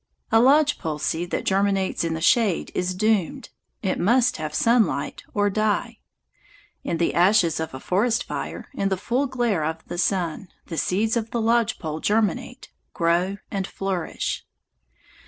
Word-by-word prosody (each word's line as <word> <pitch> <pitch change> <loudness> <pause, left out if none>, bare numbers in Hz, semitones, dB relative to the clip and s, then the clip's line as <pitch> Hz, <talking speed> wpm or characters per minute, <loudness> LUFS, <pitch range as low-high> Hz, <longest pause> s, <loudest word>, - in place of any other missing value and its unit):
A 225 - +6
lodge 290 +4 +4
pole 155 -2 -3
seed 165 +3 -2
that - - -2
germinates 195 -2 +1
in 165 -1 -1
the 160 - -5
shade 205 0 +2
is 180 0 -1
doomed. 210 -3 0 0.3
It 190 - -1
must 245 +5 +3
have 155 -1 -4
sunlight 225 -10 +1
or 205 0 +3
die. 215 0 -1 0.8
In 170 - -2
the 170 - +1
ashes 175 -2 +3
of 160 -4 -4
a - - -6
forest 225 - +1
fire, - - -6
in 195 -7 -1
the 190 - 0
full 245 +8 0
glare 240 -10 0
of 160 +1 -3
the 175 - -5
sun, 180 -1 -1 0.2
the 165 - -6
seeds 215 +5 +1
of 225 -1 -1
the 235 - -2
lodge 230 0 +2
pole 155 -1 -5
germinate, 225 +5 -1 0.2
grow, 175 +4 +1
and 195 -1 -2
flourish. 190 -3 -3
195 Hz, 160 wpm, -24 LUFS, 170-225 Hz, 0.8 s, A